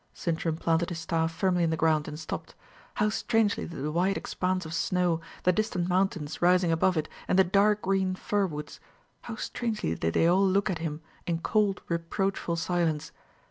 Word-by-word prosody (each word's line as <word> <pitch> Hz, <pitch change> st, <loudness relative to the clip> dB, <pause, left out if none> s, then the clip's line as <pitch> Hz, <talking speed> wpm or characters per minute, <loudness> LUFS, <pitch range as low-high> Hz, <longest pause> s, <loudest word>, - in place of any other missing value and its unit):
Sintram 165 Hz, -1 st, -1 dB
planted 165 Hz, +1 st, +1 dB
his 175 Hz, -, -4 dB
staff 165 Hz, 0 st, 0 dB
firmly 180 Hz, +1 st, +1 dB
in 165 Hz, -, +2 dB
the 160 Hz, -, 0 dB
ground, 155 Hz, -1 st, +2 dB
and 150 Hz, -1 st, -6 dB
stopped. 160 Hz, -, -6 dB, 0.4 s
How 210 Hz, 0 st, +2 dB
strangely 220 Hz, -1 st, +1 dB
did 165 Hz, -5 st, -6 dB
the 150 Hz, -, -1 dB
wide 185 Hz, +5 st, +1 dB
expanse 185 Hz, -1 st, -2 dB
of 160 Hz, -, -6 dB
snow, 170 Hz, 0 st, +1 dB, 0.2 s
the 180 Hz, -, +5 dB
distant 185 Hz, -3 st, -1 dB
mountains 180 Hz, -5 st, 0 dB
rising 180 Hz, -1 st, +4 dB
above 165 Hz, +2 st, +2 dB
it, 155 Hz, 0 st, 0 dB, 0.2 s
and -, -, +2 dB
the 190 Hz, -, +7 dB
dark 200 Hz, +3 st, +3 dB
green 190 Hz, -1 st, +1 dB
fir 200 Hz, +1 st, 0 dB
woods 150 Hz, -3 st, -7 dB, 0.4 s
how 230 Hz, -, -6 dB
strangely 220 Hz, -, -2 dB
did 80 Hz, 0 st, -1 dB
they -, -, +4 dB
all 180 Hz, +3 st, +4 dB
look 195 Hz, +1 st, +2 dB
at 170 Hz, -, -3 dB
him 160 Hz, -1 st, -4 dB, 0.3 s
in 170 Hz, -1 st, +1 dB
cold 200 Hz, +3 st, +1 dB
reproachful 170 Hz, +1 st, -1 dB
silence! 165 Hz, -3 st, -1 dB
175 Hz, 185 wpm, -28 LUFS, 165-195 Hz, 0.4 s, the